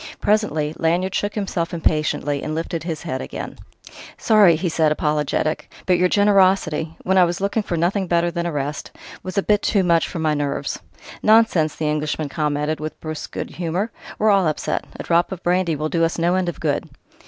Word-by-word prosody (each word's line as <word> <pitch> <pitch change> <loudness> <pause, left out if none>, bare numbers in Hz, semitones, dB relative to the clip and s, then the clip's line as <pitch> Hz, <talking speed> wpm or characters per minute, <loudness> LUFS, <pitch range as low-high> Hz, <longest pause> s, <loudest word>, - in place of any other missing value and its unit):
Presently 160 -8 +1
Lanyard 175 +3 +1
shook 205 0 -1
himself 180 -5 -2
impatiently 150 -3 0
and 155 0 -3
lifted 165 0 -3
his 160 -2 -5
head 130 0 -3
again. - - -7 0.6
"Sorry," 210 -7 +5
he 175 +4 -2
said, 160 -2 +2
apologetic 150 0 -1
"but 180 -2 +3
your 180 0 +3
generosity 190 -6 +2
when 190 +1 +3
I - - +7
looked 195 +5 0
for 170 - -2
nothing 185 +3 0
better 170 0 +1
than 170 0 -2
arrest 145 -2 -3 0.3
was 185 +2 -7
a 200 - +3
bit 210 -1 +2
too 200 -3 +2
much 170 -2 +3
for - - -6
my 160 -1 +1
nerves!" 145 -1 -2 0.4
"Nonsense!" 215 -8 +4
the 155 - -3
Englishman 150 0 -1
commented 150 +1 -1
with 155 0 -6
brusque 155 -1 -6
good - - -5
humour. 180 +6 -2 0.3
"We're 215 0 +3
all 195 -4 +3
upset. 155 - -2
A - - -4
drop 170 +2 +2
of 190 -1 -6
brandy 175 -2 +1
will 155 +1 -2
do 165 0 +1
us 165 - 0
no 170 +1 +2
end 185 -1 +1
of 175 - -7
good." - - -1
170 Hz, 190 wpm, -21 LUFS, 155-185 Hz, 0.6 s, I